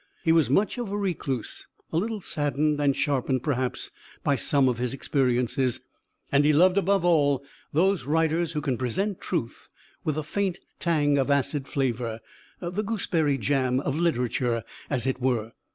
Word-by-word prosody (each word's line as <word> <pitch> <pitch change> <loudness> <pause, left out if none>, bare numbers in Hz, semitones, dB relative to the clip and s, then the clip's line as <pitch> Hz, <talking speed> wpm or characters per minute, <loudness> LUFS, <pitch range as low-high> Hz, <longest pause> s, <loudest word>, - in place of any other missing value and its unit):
He 165 - +3
was 160 -7 +4
much 200 - +2
of 230 -5 -3
a 205 - -1
recluse, 165 - -3 0.3
a - - +2
little 215 +3 -1
saddened 150 -1 0
and 140 -2 +3
sharpened 130 -3 0
perhaps 130 -4 -1 0.3
by 140 - +2
some 140 0 +2
of 120 -2 0
his 125 +1 -1
experiences; 125 -2 0 0.5
and 140 +1 +4
he 150 - +5
loved, 180 +5 +5
above 195 -1 +2
all, 145 -5 +3 0.3
those 190 +5 +2
writers 160 +2 +1
who 150 - -1
can 135 -5 -1
present 190 - -1
truth 140 -11 -4 0.3
with 155 -1 -1
a 155 - -1
faint 190 +4 -1 0.2
tang 145 -4 +2
of 135 - 0
acid 140 0 +1
flavour, 120 -4 -1 0.4
the 180 +3 -2
gooseberry 170 -9 0
jam 130 -1 +1
of 140 0 -2
literature 125 -7 0 0.3
as 130 -4 -1
it 130 -1 -1
were. 120 -3 0
145 Hz, 165 wpm, -26 LUFS, 130-170 Hz, 0.5 s, he